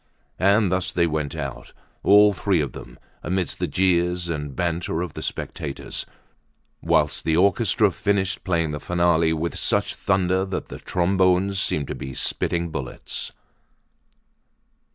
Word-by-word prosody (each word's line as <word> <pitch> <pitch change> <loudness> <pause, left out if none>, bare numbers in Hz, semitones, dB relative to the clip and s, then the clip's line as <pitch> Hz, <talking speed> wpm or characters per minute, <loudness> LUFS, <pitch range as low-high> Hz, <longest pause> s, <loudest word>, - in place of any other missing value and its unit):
And 100 0 +4
thus 95 0 0
they 85 -2 +2
went 75 -3 -2
out, - - -6 0.3
all 105 0 +6
three 95 -2 +1
of 70 -3 -2
them, - - -10 0.2
amid 90 -1 -1
the - - -3
jeers 90 -1 +1
and 75 -4 -4
banter 85 0 -1
of 90 - -6
the - - -6
spectators, 70 -2 -5 0.7
whilst - - +1
the 80 0 +1
orchestra 100 +2 +3
finished 95 -2 -1
playing 85 -4 0
the 75 - -4
finale 85 -2 +2
with 80 +1 -2
such - - +1
thunder 95 0 +1
that 95 -1 -4
the - - -8
trombones 95 +1 +2
seemed 75 -5 0
to - - -3
be 65 -1 -7
spitting 85 +6 -1
bullets. 65 -4 -5
90 Hz, 140 wpm, -23 LUFS, 80-95 Hz, 0.7 s, all